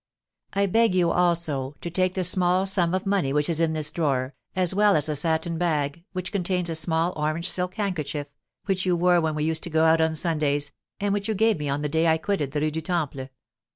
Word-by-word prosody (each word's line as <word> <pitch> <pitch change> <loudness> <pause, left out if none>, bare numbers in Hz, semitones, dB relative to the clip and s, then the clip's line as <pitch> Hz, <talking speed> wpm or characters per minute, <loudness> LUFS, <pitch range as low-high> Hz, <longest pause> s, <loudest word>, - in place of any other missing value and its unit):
I 200 +1 +2
beg 225 0 +2
you, 175 -2 +3
also, 160 -6 0
to 170 - -5
take 185 +1 +1
the 185 - 0
small 180 +1 +2
sum 185 -2 +1
of 185 - -3
money 195 -8 +1
which 150 +1 +1
is 165 -2 -1
in 165 -1 +1
this 155 -1 -1
drawer, 140 -5 -1 0.2
as 185 -1 +2
well 205 +1 +4
as 150 -1 +1
a 155 - -1
satin 160 +2 -1
bag, 155 -2 -1
which 185 -1 -5
contains 180 -2 -1
a - - -2
small 160 +2 0
orange 155 +2 -1
silk 180 0 -1
handkerchief, 155 -8 -3 0.4
which 190 -2 0
you 180 -2 +2
wore 175 0 +3
when 160 -1 -1
we 150 - -1
used 160 0 0
to - - -4
go 160 0 +2
out 160 0 +4
on 160 0 +1
Sundays, 150 -3 0 0.3
and 200 0 0
which 205 0 -2
you 220 - -1
gave 220 -2 +2
me 145 -1 -3
on 140 +2 -2
the - - 0
day 160 +3 +1
I 160 0 +4
quitted 160 -5 -2
the 145 0 -2
Rue 155 0 0
du 160 +2 -3
Temple. 150 -6 -3
165 Hz, 235 wpm, -25 LUFS, 150-185 Hz, 0.4 s, well